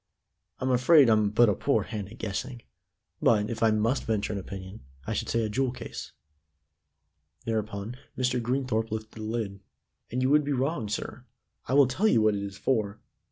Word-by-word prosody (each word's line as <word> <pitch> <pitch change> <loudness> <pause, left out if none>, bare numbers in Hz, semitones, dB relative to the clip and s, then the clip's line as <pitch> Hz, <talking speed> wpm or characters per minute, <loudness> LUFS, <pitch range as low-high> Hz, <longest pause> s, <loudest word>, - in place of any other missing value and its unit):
"I'm 130 0 -1
afraid 125 +1 +6
I'm 110 -1 +4
but 115 +3 +5
a 105 - +3
poor - - +1
hand 105 -3 -5
at 115 - -11
guessing, 115 +4 -4 0.6
but, 105 0 +3
if 115 - -5
I 115 - +5
must 110 +5 +1
venture 110 -1 -1
an 100 - -2
opinion, 95 +2 -8 0.2
I - - -2
should - - -2
say 115 0 +1
a - - 0
jewel 130 +4 0
case." 125 - -8 1.3
Thereupon 110 +1 -3 0.2
Mr. 125 -1 +1
Greenthorpe 120 -2 -1
lifted 110 0 -5
the 110 - -10
lid. 110 -3 -3 0.5
"And 125 +2 -1
you 130 - +2
would 150 0 +5
be 145 0 -1
wrong, 130 -4 -1
sir. 110 - -5 0.4
I 130 - +1
will 140 -1 +7
tell 145 - +1
you 120 - +4
what 110 -1 +4
it 100 - -2
is 100 -1 -6
for. 110 -5 0
115 Hz, 190 wpm, -28 LUFS, 105-130 Hz, 1.3 s, will